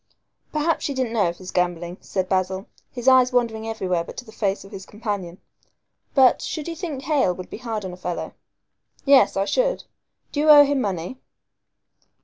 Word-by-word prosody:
"Perhaps 310 +2 0
she 280 - -2
didn't 255 -3 -1
know 215 -6 +2
of 170 0 -4
his 185 -1 -9
gambling," 175 0 -1
said 185 -2 -2
Basil, 190 +1 -1 0.3
his 245 0 -6
eyes 260 -1 +6
wandering 225 -3 0
everywhere 185 -6 -1
but - - -11
to 245 - -7
the 220 - -13
face 200 -3 -2
of 195 - -14
his 195 -2 -8
companion; 200 -5 -5 0.8
"but, 260 -3 +5
should 310 -1 -4
you 335 - -4
think 315 -6 -5
Hale 275 - +2
would 185 - -9
be - - -6
hard 225 -4 -4
on 185 - -5
a - - -10
fellow?" 180 -1 -4 0.7
"Yes, 275 -6 +5
I 195 - +1
should. - - 0 0.5
Do 290 - -3
you 305 +1 +3
owe 295 -1 +10
him 280 -1 0
money?" 190 +4 -3
220 Hz, 190 wpm, -23 LUFS, 185-265 Hz, 0.8 s, owe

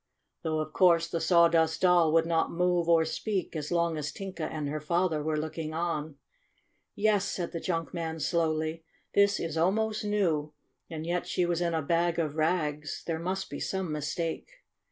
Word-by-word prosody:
Though, 155 -1 -1
of 155 0 -6
course, 170 -3 +4
the 170 -1 -3
Sawdust 165 -2 +4
Doll 175 -3 +5
would 165 0 +4
not 165 -1 +1
move 175 -1 +1
or 165 -1 +5
speak 190 +2 -3
as 150 0 -4
long 170 -2 +1
as 150 -1 -3
Tinka 190 -4 -5
and 150 -2 -3
her 150 +2 -3
father 170 +1 0
were 155 +1 -1
looking 155 0 -4
on. 160 -3 -2 0.8
"Yes," 205 -1 +2
said 175 -2 -3
the 165 - -4
junk 165 0 -2
man 165 -2 -3
slowly, 160 -1 0 0.3
"this 200 0 +4
A - - -3
HAPPY - - -1
VISIT 165 0 -3
99 170 +3 +4
is 200 - -1
almost 220 -1 -1
new. 165 -8 0 0.4
And 160 -2 -5
yet 175 +1 -1
she 180 - +1
was 175 0 0
in 170 -1 0
a 160 - -1
bag 170 +2 +1
of 155 -3 -1
rags. 155 -2 -1
There 165 -1 -2
must 185 +3 -3
be - - -5
some 190 -4 -2
mistake." 160 - -3
165 Hz, 195 wpm, -29 LUFS, 155-180 Hz, 0.8 s, Doll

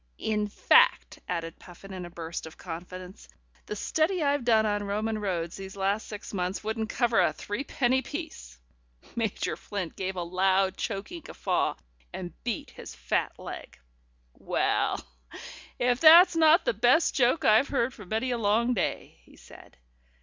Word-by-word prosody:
In 210 -1 -1
fact," 205 - +3
added 165 -1 -4
Puffin 190 +2 -12
in 185 -1 -6
a - - -9
burst 165 -1 -6
of 160 - -13
confidence, 180 +2 -9 0.4
"the 210 - -4
study 320 - 0
I've 285 -2 +1
done 220 -2 +4
on 205 -1 0
Roman 215 +2 -2
roads 175 -4 -3
these 195 0 -8
last 200 +2 -1
six 210 0 -8
months 185 +1 -2
wouldn't 220 +1 -3
cover 240 -2 +2
a - - +3
threepenny 255 +3 -1
piece." 300 - -8 0.6
Major 225 -3 -2
Flint 190 -5 -6
gave 190 0 -3
a 175 - -3
loud, 190 +2 +1
choking 270 - -5
guffaw - - -1 0.4
and - - -7
beat - - -4
his - - -10
fat - - -2
leg. - - -9 0.6
"Well, - - -1 0.7
if 245 0 +1
that's 335 +3 +8
not 325 +1 +5
the - - +2
best 325 - +3
joke 250 +4 +2
I've 220 +6 +5
heard 255 -2 0
for 210 - -11
many 220 +7 -2
a 240 - -1
long 225 +3 +2
day," 215 - -3
he - - -20
said. - - -16
210 Hz, 155 wpm, -27 LUFS, 185-245 Hz, 0.7 s, that's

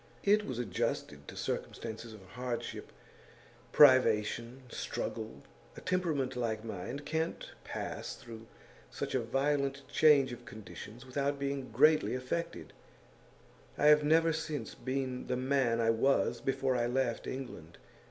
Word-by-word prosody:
It 210 +1 +4
was 130 - -3
adjusted 90 - -2
to - - -9
circumstances 115 0 -4
of 105 -3 -12
hardship, 125 +3 -5 0.8
privation, 120 -2 +5
struggle. 110 -1 -4 0.3
A - - -8
temperament 155 -8 0
like 110 -3 -2
mine 110 +6 -5
can't 160 +3 -3
pass - - -5
through 115 -1 -11 0.4
such - - -4
a 130 - +2
violent 140 +3 0
change 145 -4 +5
of 120 0 -8
conditions 110 +2 -10
without 140 +2 -1
being 140 -1 -3
greatly 150 +4 +4
affected; 130 +7 -4 1.0
I 150 - +5
have 150 0 +7
never 165 +2 +4
since 155 -6 -4
been 130 -1 -3
the 125 - 0
man 130 -3 +2
I 115 0 +4
was 135 +5 +2
before 135 -1 0
I 120 -1 +1
left 125 -1 -1
England. 90 -11 -7
130 Hz, 130 wpm, -32 LUFS, 115-140 Hz, 1.0 s, have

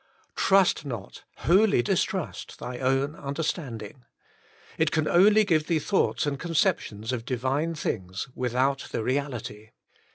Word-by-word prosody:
Trust 195 -2 +3
not, 115 -9 -7 0.2
wholly 190 - +4
distrust, - - -2
thy 125 0 -6
own 135 +3 +1
understand 140 -4 -3
ing. 115 +5 -12 0.8
It - - +3
can 155 -1 0
only 210 +5 +6
give 155 -5 +1
thee 170 - +2
thoughts 190 +3 +1
and 140 -1 -2
concep 165 -1 +2
tions 110 +3 -6
of 125 -3 -3
Divine 135 +7 -1
things 95 - -3
without 130 +2 0
the - - -2
reality. 125 -5 -3
140 Hz, 135 wpm, -26 LUFS, 120-160 Hz, 0.8 s, only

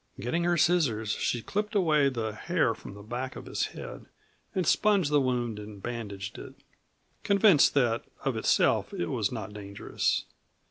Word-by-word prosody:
Getting 165 +10 -1
her 175 0 +2
scissors 140 -11 +2
she 120 - -1
clipped 210 +2 -2
away 155 -7 +4
the 115 -4 -3
hair 160 - +1
from 100 - -11
the 100 - -11
back 125 +4 -4
of - - -8
his - - -1
head - - -9 0.5
and 185 -2 +1
sponged 200 -8 +3
the 145 -1 +4
wound 120 -4 -1
and 105 -1 -9
bandaged 105 -3 -6
it, - - -10 0.7
convinced 200 -8 +5
that 120 -4 +2 0.2
of - - +1
itself - - +2
it 85 - -2
was 110 -6 0
not 110 -3 -5
dangerous. 100 -1 -2
125 Hz, 165 wpm, -28 LUFS, 110-170 Hz, 0.7 s, convinced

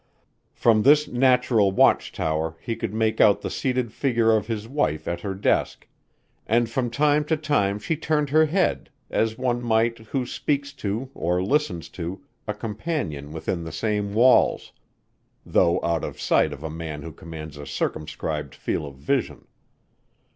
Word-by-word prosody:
From 110 -2 +4
this 150 +4 +5
natural 125 -5 +3
watch 95 - +3
tower 80 +1 -2
he 115 - -4
could 110 - -4
make 110 0 +1
out 100 - +5
the - - -4
seated 125 -3 -1
figure 115 -5 +2
of 105 -1 -1
his 110 -2 -4
wife 95 - -1
at 85 0 -2
her 95 0 -4
desk 95 - 0 0.6
and 115 +2 +3
from 120 +1 -1
time 150 +4 +2
co 160 +2 0
time 145 -11 0
she 135 +10 -2
turned 150 -2 0
her 155 +1 +5
head, 180 +4 0 0.2
as 110 0 0
one 125 -1 0
might, 115 0 +1
who 125 +4 -3
speaks 140 +2 -2
to, 115 +2 -4
or 90 +2 0
listens 100 - 0
to, 90 +7 -6 0.2
a 105 - -1
companion 105 - -4
within 85 +2 -3
the 80 - -6
same 105 +3 -2
walls, 120 +1 +4 0.7
though 85 - +3
out 85 -2 0
of - - -6
sight - - +2
of 70 - -8
a 80 - -4
man 80 -2 -6
who 80 - -7
commands 80 0 -9
a 75 -1 -9
circumscribed 75 0 -3
field 75 - -3
of - - -20
vision. 130 - -1
110 Hz, 165 wpm, -24 LUFS, 85-130 Hz, 0.7 s, this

